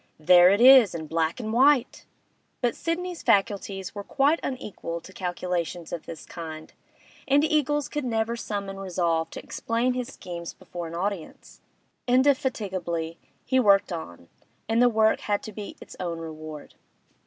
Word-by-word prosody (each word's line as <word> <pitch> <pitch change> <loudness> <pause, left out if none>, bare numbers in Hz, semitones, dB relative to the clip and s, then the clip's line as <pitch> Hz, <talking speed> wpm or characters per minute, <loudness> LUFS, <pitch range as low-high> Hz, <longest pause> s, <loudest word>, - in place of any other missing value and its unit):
'There 175 +3 +7
it 200 +2 +3
is 245 -7 +8
in 160 -1 -5
black 160 +3 -1
and 220 -2 -4
white!' 265 +1 +3 0.5
But 245 -2 0
Sidney's 350 +1 -3
faculties 195 -2 0
were 205 - -6
quite 290 +8 +2
unequal 205 -9 -5
to 190 +3 -14
calculations 175 -2 -3
of 170 - -6
this 165 - -8
kind, 160 -2 -8 0.5
and 285 +2 +4
Eagles 295 -2 +1
could 295 -1 -3
never 230 -1 -1
summon 200 -4 -4
resolve 170 -4 0
to - - -8
explain 235 +2 -1
his 250 -1 -3
schemes 170 -6 -7
before 175 -1 -7
an 165 - -7
audience. 190 -1 -5 0.5
Indefatigably 200 - 0 0.3
he 260 - +2
worked 200 -6 +4
on, 85 - -8 0.4
and 225 +1 +2
the 245 - +6
work 220 -1 +3
had 205 -1 -1
to 215 - -7
be 210 0 -8
its - - -12
own 170 -2 -3
reward. 155 -2 -8
200 Hz, 155 wpm, -26 LUFS, 170-250 Hz, 0.5 s, is